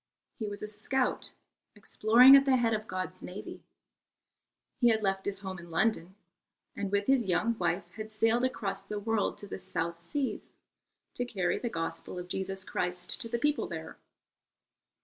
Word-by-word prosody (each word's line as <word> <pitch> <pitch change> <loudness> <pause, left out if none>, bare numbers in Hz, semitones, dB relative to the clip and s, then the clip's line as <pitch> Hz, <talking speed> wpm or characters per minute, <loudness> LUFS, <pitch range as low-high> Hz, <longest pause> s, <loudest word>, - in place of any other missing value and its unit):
He 220 - -2
was 205 0 -6
a - - -3
scout 235 +5 -1 0.4
exploring 230 +5 +7
at 275 0 +6
the 270 -2 +4
head 230 -2 +2
of 215 0 -2
God's 185 0 -4
navy. 185 +3 -8 1.2
He 240 - +5
had 220 -1 +2
left 195 -1 0
his 200 -1 -3
home 190 -2 -5
in 170 0 -11
London 185 0 0 0.6
and 200 -1 -3
with 200 0 +1
his 250 -6 +2
young 230 +6 +2
wife 175 0 0
had 215 +2 -7
sailed 225 +3 +2
across 200 -6 -2
the 210 +2 -5
world 220 0 0
to 205 - -7
the 195 - -6
South 170 -1 -3
Seas 280 - -3 0.6
to 245 - +1
carry 195 -7 -1
the 240 - -2
Gospel 165 -1 -4
of 180 0 -6
Jesus 190 0 -3
Christ 180 +8 -2
to 230 - -2
the 235 - 0
people 295 +4 +1
there. - - -7
205 Hz, 170 wpm, -30 LUFS, 185-230 Hz, 1.2 s, exploring